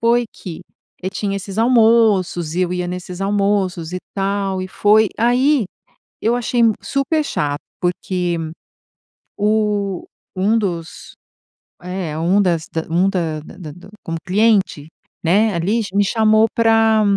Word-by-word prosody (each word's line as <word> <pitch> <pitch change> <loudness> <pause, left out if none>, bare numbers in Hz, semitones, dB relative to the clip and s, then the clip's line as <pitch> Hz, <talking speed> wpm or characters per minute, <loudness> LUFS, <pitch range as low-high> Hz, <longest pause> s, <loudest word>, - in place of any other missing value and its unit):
foi 235 +1 +3
que 175 -5 -8 0.4
e 185 - -1
tinha 200 0 -2
esses 195 0 -7
almoços, 220 -8 +3
e 185 - +1
eu 180 - -1
ia 180 -1 -2
nesses 180 0 -6
almoços, 195 -4 0
e 180 - -2 0.2
tal, 195 -1 -1
e - - -4
foi 210 +3 +3
aí, 250 +3 +3 0.6
eu 230 +2 +2
achei 245 0 -1
m 230 -1 +5
super 275 +3 0
chato, 145 - -2 0.2
porque 180 0 -1 1.0
o 210 -2 0 0.3
um 200 +5 +2
dos 170 -6 -5 0.7
é, 180 -4 -4
um 180 +5 +2
das 170 -4 0
da 160 - -2
um 175 +4 +2
da 165 -5 -2
da 160 0 -10
da 180 +4 -14
como 165 0 -4
cliente, 195 -6 +2 0.4
né, 205 +6 +3
ali, 180 +6 0
m - - -1
me 205 - +4
chamou 220 +1 +4
pra 225 -1 +4
195 Hz, 145 wpm, -19 LUFS, 180-220 Hz, 1.0 s, m